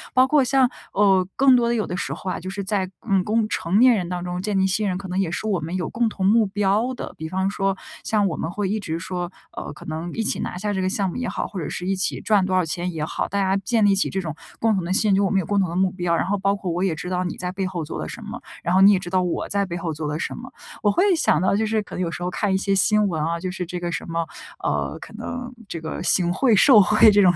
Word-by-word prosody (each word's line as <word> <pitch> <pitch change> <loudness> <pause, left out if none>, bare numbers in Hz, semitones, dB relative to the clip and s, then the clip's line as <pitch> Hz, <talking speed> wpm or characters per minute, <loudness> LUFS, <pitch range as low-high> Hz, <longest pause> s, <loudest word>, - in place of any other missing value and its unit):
包 255 0 +6
括 280 0 +3
像， 265 0 +3 0.3
呃， 195 -2 +4
更 265 -1 +6
多 235 -1 +3
的 235 - +1
有 215 - 0
的 180 - -4
时 - - -3
候 185 - -4
啊， - - -3
就 185 +2 -6
是 200 +1 -4
在， 190 -2 -1 0.2
嗯， 195 -2 +3
共 215 +1 +1
成 190 -1 0
年 250 0 +7
人 180 -4 -2
当 180 -1 -3
中 180 0 -3
建 205 0 -1
立 190 - +3
信 205 +2 +1
任， 180 - -1
可 195 0 -7
能 185 +1 -2
也 190 -4 +1
是 175 - -4
我 200 -5 +1
们 165 +3 -4
有 180 - -2
共 235 -1 0
同 195 -3 -3
目 215 +2 +4
标 205 +5 0
的。 - - -7
比 160 0 -6
方 190 +1 0
说 195 -1 -1 0.3
像 210 -2 +1
我 170 - -2
们 160 - -3
会 200 +2 -2
一 215 +2 -1
直 165 -4 -3
说， 175 +1 -4 0.2
呃， - - -5
可 150 - -13
能 160 +2 -4
一 225 - -1
起 - - 0
拿 - - -4
下 205 +2 -2
这 190 - -1
个 185 - 0
项 195 0 0
目 - - -9
也 250 - -2
好， - - -3
或 195 - -6
者 160 - -4
是 180 - -5
一 195 - 0
起 190 - -1
赚 210 -2 +3
多 185 0 0
少 185 - +3
钱 175 +2 -3
也 155 - -3
好， 155 - -2
大 200 - -3
家 190 0 +2
建 220 +3 +1
立 200 - +5
起 195 - +1
这 190 - -2
种 160 -4 -4 0.3
共 225 -1 +2
同 190 - 0
的 185 - -1
信 215 +1 +2
任， 195 - +4
就 - - +2
是 - - +3
我 190 - +1
们 195 - +2
有 - - -6
共 205 +3 +1
同 190 -3 +1
的 170 - -5
目 185 0 +2
标， 175 -2 0
然 - - 0
后 200 +2 0
包 200 +1 +1
括 190 -3 -4
我 175 +2 -2
也 185 -4 +1
知 180 +4 -6
道 180 0 0
你 175 - -3
在 180 0 -4
背 190 0 -2
后 175 -3 -4
做 150 - -6
了 80 - -4
什 - - -8
么， - - -7 0.2
然 175 - 0
后 190 - +5
你 200 +1 +8
也 185 - +2
知 175 - -7
道 185 0 +2
我 180 -2 -2
在 200 0 +1
背 175 -2 -5
后 170 -2 -3
做 150 0 -4
了 150 +1 -2
什 - - -3
么。 - - -8 0.3
我 210 - +3
会 205 - +2
想 155 - +3
到 190 - +2
就 220 - +1
是 220 0 0
可 - - -9
能 - - -3
有 175 - 0
时 175 +2 -5
候 180 - -1
看 200 +1 0
一 - - +3
些 195 +1 0
新 210 +2 +3
闻 160 -4 -2
啊， 165 +1 -1
就 185 +1 -4
是 180 0 -4
这 180 +1 -5
个 175 0 -3
什 165 - -5
么， 165 0 -1 0.4
呃， - - -1
可 - - -11
能 250 0 -6
这 165 - -6
个 160 - -5
行 175 0 +3
贿 230 +2 +3
受 235 +1 +7
贿 215 +2 +6
这 205 - +5
种 180 -2 +5
190 Hz, 345 characters per minute, -23 LUFS, 175-210 Hz, 0.4 s, 你